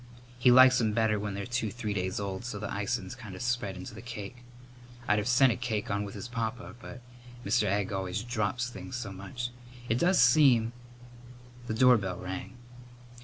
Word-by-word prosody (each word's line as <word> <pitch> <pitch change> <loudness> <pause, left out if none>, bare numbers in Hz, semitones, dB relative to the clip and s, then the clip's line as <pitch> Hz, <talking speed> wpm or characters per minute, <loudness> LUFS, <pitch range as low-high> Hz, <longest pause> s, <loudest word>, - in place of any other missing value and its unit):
He 125 - +5
likes 130 0 +7
'em 110 -2 +1
better 110 -1 +2
when 105 -1 -4
they're 100 - -4
two 120 -2 -1
three 110 -1 -4
days 95 0 -2
old 100 0 -4
so 120 -4 -5
the 105 0 -4
icin's 105 +6 -2
kind 110 -7 -9
of 90 - -8
spread 120 -6 -1
into 90 +6 -8
the 110 - -9
cake. 115 -1 -7 0.7
I'd 105 - +3
of 105 - -3
sent 125 +1 +5
a - - -1
cake 115 -5 -3
on 100 0 0
with 100 - -8
his 120 - -6
papa, 115 -1 -4
but - - -10 0.4
Mr. 110 +2 +2
Egg 100 0 0
always 95 +2 -2
drops 120 +1 -1
things 95 -2 -8
so 120 -5 -5
much. 100 +6 -6 0.4
It 115 +2 +1
does 180 +4 +3
seem 120 -3 +5 0.5
" 120 0 -18
The 110 - -2
doorbell 110 -7 +4
rang. 95 +8 -6
110 Hz, 195 wpm, -29 LUFS, 100-125 Hz, 0.7 s, likes